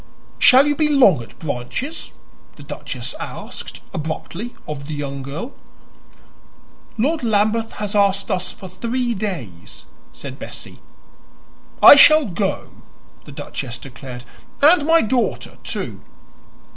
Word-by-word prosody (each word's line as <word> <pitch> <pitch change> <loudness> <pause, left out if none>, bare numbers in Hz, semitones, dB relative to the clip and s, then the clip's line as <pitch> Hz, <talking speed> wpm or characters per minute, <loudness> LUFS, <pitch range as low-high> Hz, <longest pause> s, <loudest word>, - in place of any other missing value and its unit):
"Shall 270 0 +7
you 290 - +1
be 305 +1 +2
long 255 - +5
at 115 - -13
Branches?" 155 - -5 0.5
the - - -13
duchess - - -5
asked, - - -8
abruptly, 170 +7 -5
of 145 -2 -6
the 155 - -4
young 140 -1 -5
girl. 155 - -6 1.4
"Lord 295 +6 0
Lambeth 220 0 +1
has 210 -1 -4
asked 200 -1 +2
us 185 0 -2
for 195 - -10
three 235 +6 -2
days," 165 - -6 0.3
said 130 +12 -9
Bessie. - - -8 1.0
"I - - +12
shall 310 +1 +8
go," 195 0 -3 0.5
the - - -11
duchess 120 -2 -6
declared, 125 -1 -10 0.3
"and 300 +1 +5
my 330 0 +6
daughter, 240 +3 -1
too." - - -5
200 Hz, 120 wpm, -20 LUFS, -, 1.4 s, I